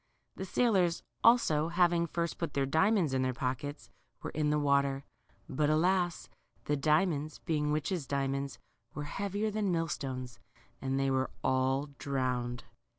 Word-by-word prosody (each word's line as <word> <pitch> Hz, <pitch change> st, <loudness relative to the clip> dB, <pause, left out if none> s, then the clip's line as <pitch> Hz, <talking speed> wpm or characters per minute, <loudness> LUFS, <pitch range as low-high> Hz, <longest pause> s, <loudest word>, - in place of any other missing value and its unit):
The 190 Hz, -, -5 dB
sailors 190 Hz, -5 st, +2 dB, 0.2 s
also, 160 Hz, -10 st, +5 dB
having 170 Hz, 0 st, +2 dB
hrst 170 Hz, +1 st, -2 dB
put 165 Hz, -4 st, -3 dB
their 140 Hz, -1 st, +2 dB
diamonds 160 Hz, +2 st, +2 dB
in 130 Hz, -, +1 dB
their 130 Hz, -1 st, 0 dB
pockets, 130 Hz, +4 st, -4 dB, 0.3 s
were -, -, -4 dB
in 150 Hz, -1 st, 0 dB
the 150 Hz, -, +2 dB
water; 140 Hz, -1 st, +2 dB, 0.4 s
but 150 Hz, +2 st, 0 dB
alas! 175 Hz, +2 st, +2 dB, 0.4 s
the 150 Hz, -, +1 dB
diamonds, 155 Hz, +1 st, +1 dB
being 150 Hz, -3 st, 0 dB
witches' 155 Hz, 0 st, -1 dB
dia 140 Hz, 0 st, 0 dB
monds, 140 Hz, 0 st, -3 dB, 0.4 s
were 150 Hz, -, -3 dB
heavier 200 Hz, +7 st, -2 dB
than 205 Hz, -2 st, 0 dB
millstones, 130 Hz, -7 st, -3 dB, 0.4 s
and 135 Hz, 0 st, -1 dB
they 135 Hz, 0 st, +1 dB
were 130 Hz, 0 st, +1 dB
all 130 Hz, +2 st, +1 dB
drowned. 125 Hz, -3 st, -2 dB
150 Hz, 150 wpm, -31 LUFS, 135-170 Hz, 0.4 s, also